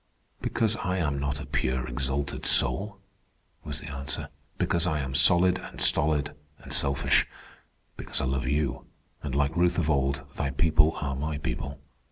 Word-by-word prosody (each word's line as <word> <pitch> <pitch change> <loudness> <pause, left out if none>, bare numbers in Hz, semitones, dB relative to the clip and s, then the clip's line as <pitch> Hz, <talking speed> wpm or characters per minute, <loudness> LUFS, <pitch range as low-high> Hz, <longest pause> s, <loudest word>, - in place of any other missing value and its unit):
"Because 110 -1 0
I 90 -3 -2
am 75 -5 -1
not 70 0 -2
a 75 - -6
pure, 65 0 -1
exalted 65 +3 -3
soul," 100 +1 +3 0.7
was - - -5
the 75 - -8
answer. 70 0 -4 0.3
"Because 85 0 +1
I 80 -3 0
am 65 -2 -4
solid 90 +5 +4
and - - -10
stolid 75 -1 +3 0.2
and - - -4
selfish. 70 0 +3 0.7
Because - - -3
I - - -1
love 65 -1 -1
you 70 +1 -1 0.4
and, 70 -3 -4
like 70 +2 +1
Ruth 90 0 +2
of 80 -3 +1
old, 70 -1 0
thy 70 - -1
people 75 +2 +3
are 70 -2 -2
my 75 +2 -3
people. 70 0 -4
70 Hz, 165 wpm, -27 LUFS, 70-80 Hz, 0.7 s, solid